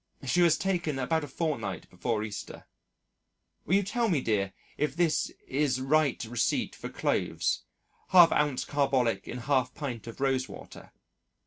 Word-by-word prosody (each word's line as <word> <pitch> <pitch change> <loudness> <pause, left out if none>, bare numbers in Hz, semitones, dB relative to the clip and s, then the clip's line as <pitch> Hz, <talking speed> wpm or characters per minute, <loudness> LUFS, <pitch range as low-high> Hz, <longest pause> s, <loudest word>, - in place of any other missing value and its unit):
She 175 +7 +2
was 170 -2 +5
taken 175 -6 -1
about 155 +5 0
a - - -5
fortnight 130 - -3
before 110 +4 -1
Easter. 105 -2 -7 1.0
Will 180 - +3
you 200 - +3
tell 230 +4 0
me 165 -6 +2
dear 105 -6 0 0.2
if 150 - -1
this 165 -2 +1 0.2
is 135 -1 +1
right 145 +2 +2
receipt 115 +1 0
for - - -7
clothes - - -1 0.5
1/2 175 -3 +8 0.2
oz. 125 - -3
carbolic 135 -5 +1
in 125 - -5
1/2 130 -2 +1
pint 125 -7 -5
of 115 - -9
rose 135 -1 +1
water. - - -11
135 Hz, 150 wpm, -29 LUFS, 120-160 Hz, 1.0 s, 1/2